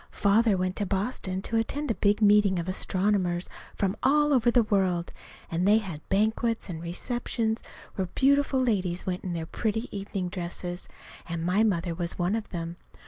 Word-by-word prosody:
Father 210 0 +4
went 185 0 -1
to 205 - 0
Boston 190 -1 -2
to 230 - -1
attend 280 +5 -1
a - - +2
big 210 +1 +2
meeting 205 -2 +5
of 170 0 -3
astronomers 185 -1 0 0.3
from 195 0 0
all 295 +2 +4
over 245 -2 +4
the 240 0 +4
world, 185 -5 0 0.4
and 175 +3 +1
they 210 +2 +6
had 185 -9 -4
banquets 220 +2 +1
and 165 -2 -5
receptions 225 +5 -2 0.3
where 190 -2 -2
beautiful 280 0 +3
ladies 190 -8 0
went 180 -1 -3
in 180 - -3
their 165 -1 -3
pretty 220 +6 -3
evening 195 -2 -3
dresses, 175 0 -5 0.4
and 165 0 -3
my 190 +5 +3
mother 175 -5 +1
was 170 0 -2
one 180 +4 +1
of 225 -2 -4
them. 170 -1 -5
195 Hz, 175 wpm, -27 LUFS, 180-225 Hz, 0.4 s, they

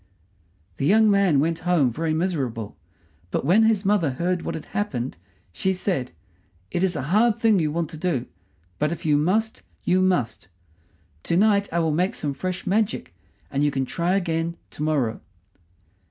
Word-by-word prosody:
The - - -1
young 215 +3 +5
man 195 -8 +4
went 165 +3 0
home 165 -8 +2
very 160 +6 -2
miserable; 135 - -2 0.5
but - - -2
when 205 +8 +5
his 215 -3 +2
mother 195 -6 +3
heard 175 +5 -1
what - - -4
had 160 - -7
happened 135 - -3 0.4
she 190 - 0
said: 180 -8 -2 0.6
"It 175 - 0
is 185 -2 +1
a 145 - -2
hard 225 +1 +4
thing 225 -4 +3
you 155 -2 0
want 165 0 -2
to 160 - -8
do; 155 -8 -1 0.5
but 150 +1 +1
if 170 -1 -6
you 150 -2 +3
must, 205 +9 +1 0.2
you 185 +1 +2
must. 180 - 0 0.8
To 170 - +1
night 200 0 +3
I 170 - -1
will 165 -2 +2
make 180 +5 0
some 145 -2 -2
fresh 180 +6 -4
magic, 195 - 0 0.4
and 140 - 0
you 145 - +3
can 135 -2 -1
try 170 +7 0
again 170 -2 -1
to - - -9
morrow." 140 -8 0
170 Hz, 175 wpm, -24 LUFS, 150-190 Hz, 0.8 s, young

